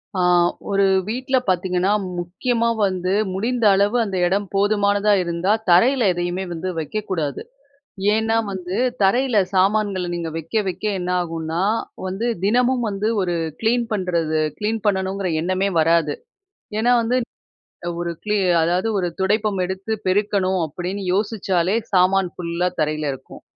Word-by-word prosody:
அ - - -1 0.5
ஒரு 200 0 +3 0.2
வீட்டில 260 +3 0
பார்த்தீங்கன்னா, 185 +1 +1 0.3
முக்கியமா 230 +7 -1 0.2
வந்து 185 0 -1 0.2
முடிந்த 230 +4 -1
அளவு 200 +4 +2
அந்த 195 -4 -3
இடம் 195 +3 0
போதுமானதா 205 0 +2
இருந்தா 170 +3 -1 0.2
தரையில 240 +9 +5
எதையுமே 175 +2 -2
வந்து 170 +3 -4
வைக்கக்கூடாது. 160 -4 -3 0.7
ஏன்னா, 225 +1 +1 0.2
வந்து 185 0 -4 0.3
தரையில 240 +4 +3 0.2
சாமான்கள 195 -1 +2
நீங்க 170 -1 -3
வைக்க 165 +7 -1
வைக்க 185 +3 -5 0.2
என்னாகும்னா 170 -2 -2 0.4
வந்து, 195 +5 -3 0.2
தினமும் 245 +3 +2
வந்து 200 +2 -1
ஒரு 175 -2 -1 0.3
கிளீன் 235 +1 +2
பண்ணுறது 170 -6 0 0.2
கிளீன் 220 +1 -1
பண்ணணுங்கிற 190 -1 0
எண்ணமே 185 +3 0
வராது. 160 -2 +2 0.6
ஏன்னா 240 +3 +3
வந்து 235 +2 0 0.8
ஒரு 170 0 -2
கிளி 210 0 0 0.2
அதாவது, 175 +6 +1
"ஒரு 180 -2 0
துடைப்பம் 210 +1 +1
எடுத்து 190 +4 -4
பெருக்கணும்" 190 -1 +1
அப்படின்னு 180 +6 -5
யோசிச்சாலே, 195 -3 0 0.2
சாமான் 185 0 +3
ஃபுல்லா 175 +1 -1
தரையில 155 -1 0
இருக்கும். 135 - -11
190 Hz, 125 wpm, -21 LUFS, 175-215 Hz, 0.8 s, தரையில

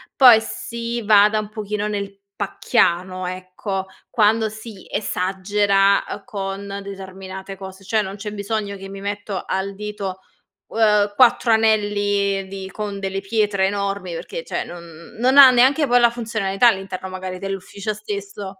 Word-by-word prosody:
poi 245 -4 +8
si 235 +1 -5
vada 210 0 +5
un 210 -1 -5
pochino 210 -1 -3
nel 200 -1 -4 0.2
pacchiano, 185 -3 0
ecco, 185 +1 -5 0.2
quando 220 -1 +3
si 215 -2 -11
esagera, 195 0 +1
uhm, 205 - -6
con 200 -2 -5
determinate 190 0 -8
cose. 190 0 -10
Cioè, 215 +2 +1
non 190 0 -6
c'è 210 +1 -6
bisogno 205 0 -3
che 195 0 -9
mi 195 0 -8
metto 205 -1 -4
al 195 +1 -2
dito, 200 -2 -5 0.5
uhm, 210 -2 +3
4 240 0 +4
anelli 205 -3 +2
di 190 0 -7
con 205 -1 -5
delle 195 0 -2
pietre 205 -1 +1
enormi. 200 -2 -3
Perché, - - -6
cioè, - - -3
non 170 -1 -12
non 260 +3 +3
ha 270 -2 +11
neanche 265 +5 +4
poi 245 0 +5
la 235 -1 +6
funzionalità 225 -2 +1
all'interno, 190 -3 -1
magari, 185 0 -6
dell'ufficio 195 +2 -4
stesso 200 -2 -7
200 Hz, 145 wpm, -21 LUFS, 195-215 Hz, 0.5 s, ha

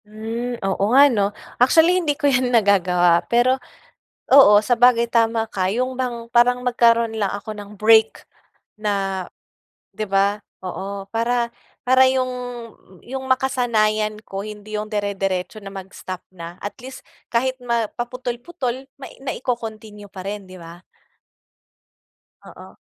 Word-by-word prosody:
Hmm. 225 +3 -5
Oo 195 0 -1
nga 280 - +9
'no, 200 -2 +1 0.3
actually 320 +7 +5
hindi 295 -4 -1
ko 295 - -3
yan 255 -3 +3
nagagawa. 180 -6 +3
Pero 250 +2 +2 0.7
oo 210 -7 +8
sabagay 245 0 +4
tama 230 -1 +2
ka 190 -4 -2
yung 250 +6 -1
bang 250 -2 -4
parang 245 +1 +3
magkaroon 235 -2 +3
lang 200 - +1
ako 210 +2 -7
ng 205 -1 -10
break 220 +1 +4 0.5
na, 195 -3 -2 0.7
'di 215 - -5
ba, 200 +1 +1 0.2
oo. 195 +2 -5
Para 235 +1 0 0.3
para 260 +1 +5
yung 260 -1 0 0.7
yung 265 +1 -6
makasanayan 225 -5 +1
ko 195 0 -6
hindi 210 0 -6
yung 210 - -5
dere-deretso 200 -1 -2
na 195 -1 -10
mag 190 0 -8
stop 185 -1 -8
na 170 -1 -9
at 205 - -5
least 260 +2 -10 0.3
kahit 255 +2 +1
ma 235 -3 -1
paputol-putol 250 +2 -5 0.4
na 265 - -2
ico-continue 220 -4 -5
pa 190 -2 -10
rin 200 0 -6
'di 185 - -12
ba? 170 0 -12 1.6
Oo. - - -13
225 Hz, 135 wpm, -21 LUFS, 200-245 Hz, 1.6 s, nga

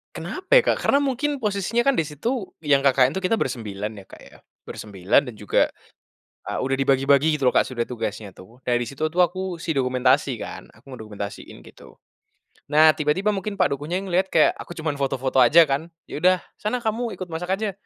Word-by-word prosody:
Kenapa 375 +4 -7
ya, - - +3
Kak? - - 0
Karena 280 - +4
mungkin 280 +2 -1
posisinya 210 +2 0
kan 275 - +4
di 165 - +2
situ 205 - -3
yang 145 -2 +4
KKN 130 -1 +4
itu 190 - -2
kita 225 - +2
bersembilan 110 - -4
ya, 100 - -11
Kak - - -14
ya. - - -16 0.3
Bersembilan, 105 +6 0
dan 110 - -15
juga, 105 -1 +1 0.8
ah, - - -3
udah 135 +1 0
dibagi-bagi 140 +3 +3
gitu 135 -3 +2
loh, - - 0
Kak, - - +5
sudah 120 -2 -3
tugasnya 105 -4 -5
tuh. 115 +7 -16
Dari 120 0 +1
situ 140 +5 -3
tuh 170 +3 -1
aku 185 0 -4
si 160 - -2
dokumentasi 130 +1 +2
kan, - - -8
aku 110 - -24
mendokumentasin 105 - -8
gitu. - - -16 0.7
Nah 155 +2 +6
tiba-tiba 155 +8 0
mungkin 200 +1 -4
Pak - - +1
Dukuhnya 155 +5 -4
yang 190 0 -4
ngelihat 185 +2 +2
kayak - - +4
aku 175 - -9
cuman 155 -3 -3
foto-foto 135 -1 0
aja 145 +7 +7
kan, 145 +1 -2 0.2
“Ya - - -7
udah 185 +2 +3 0.2
sana 235 +3 -2
kamu 225 +1 -2
ikut 185 -2 -8
masak 180 +3 -2
aja.” 210 0 -3
150 Hz, 200 wpm, -23 LUFS, 125-190 Hz, 0.8 s, aja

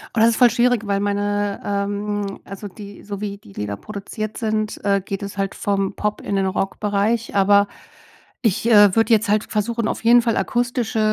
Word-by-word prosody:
Oh, - - +1
das 225 +1 +6
ist - - -1
voll 245 -1 +6
schwierig, 240 -1 +2
weil 200 0 +1
meine, 205 0 -1
ähm 205 0 -2
also 195 +1 -8
die 200 +1 -11
so 200 -1 -6
wie 200 -1 -4
die 100 - -17
Lieder 100 0 -4
produziert 215 - -6
sind, 215 -1 -1
äh, 200 -1 +2
geht 195 +1 -5
es 200 0 -7
halt 195 0 -2
vom 195 -1 -1
Pop 210 0 -2
in 200 - -3
den 195 -1 +1
Rockbereich. 205 +4 -1
Aber 200 0 +4 0.7
ich, 225 0 +1
äh, 205 -4 +7
würde 225 +1 +3
jetzt 220 -1 +2
halt 210 +1 +2
versuchen, 225 +1 -1
auf - - -3
jeden 240 +1 +6
Fall 230 -1 0
akustische, 240 -2 -1
205 Hz, 195 wpm, -21 LUFS, 200-220 Hz, 0.7 s, äh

